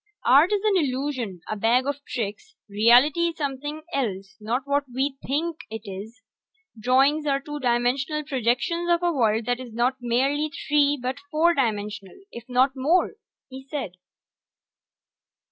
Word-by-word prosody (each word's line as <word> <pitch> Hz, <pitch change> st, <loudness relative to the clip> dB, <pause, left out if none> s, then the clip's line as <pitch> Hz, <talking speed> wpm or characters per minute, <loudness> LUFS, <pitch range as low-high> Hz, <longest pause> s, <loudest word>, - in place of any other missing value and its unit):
"Art 280 Hz, -, +6 dB
is 410 Hz, -1 st, +1 dB
an 420 Hz, -3 st, +3 dB
illusion, 260 Hz, -, -2 dB
a 215 Hz, -, -3 dB
bag 230 Hz, +5 st, +2 dB
of 285 Hz, 0 st, -3 dB
tricks. 240 Hz, -, -5 dB
Reality 245 Hz, +11 st, +4 dB
is 335 Hz, -, -5 dB
something 290 Hz, +1 st, -4 dB
else, 200 Hz, -7 st, -3 dB
not 235 Hz, +5 st, -2 dB
what 285 Hz, 0 st, +1 dB
we 270 Hz, +2 st, -2 dB
think 315 Hz, +4 st, -1 dB
it 220 Hz, 0 st, -7 dB
is. 210 Hz, +5 st, -9 dB, 0.5 s
Drawings 270 Hz, +7 st, +2 dB
are 275 Hz, -1 st, +2 dB
two 295 Hz, +1 st, -7 dB
dimensional 255 Hz, +4 st, 0 dB
projections 275 Hz, +6 st, -1 dB
of 345 Hz, 0 st, +2 dB
a 345 Hz, -1 st, +2 dB
world 225 Hz, -4 st, +1 dB
that 245 Hz, 0 st, -1 dB
is 250 Hz, -2 st, -8 dB
not 250 Hz, +3 st, +1 dB
merely 275 Hz, +6 st, 0 dB, 0.2 s
three 290 Hz, 0 st, +3 dB
but 255 Hz, +3 st, -3 dB
four 330 Hz, +3 st, +3 dB
dimensional, 210 Hz, -, -2 dB
if 235 Hz, +1 st, -10 dB
not 255 Hz, +2 st, +3 dB
more," 300 Hz, +8 st, +2 dB, 0.4 s
he 265 Hz, 0 st, -10 dB
said. 290 Hz, -, -4 dB
265 Hz, 150 wpm, -24 LUFS, 235-295 Hz, 0.5 s, Art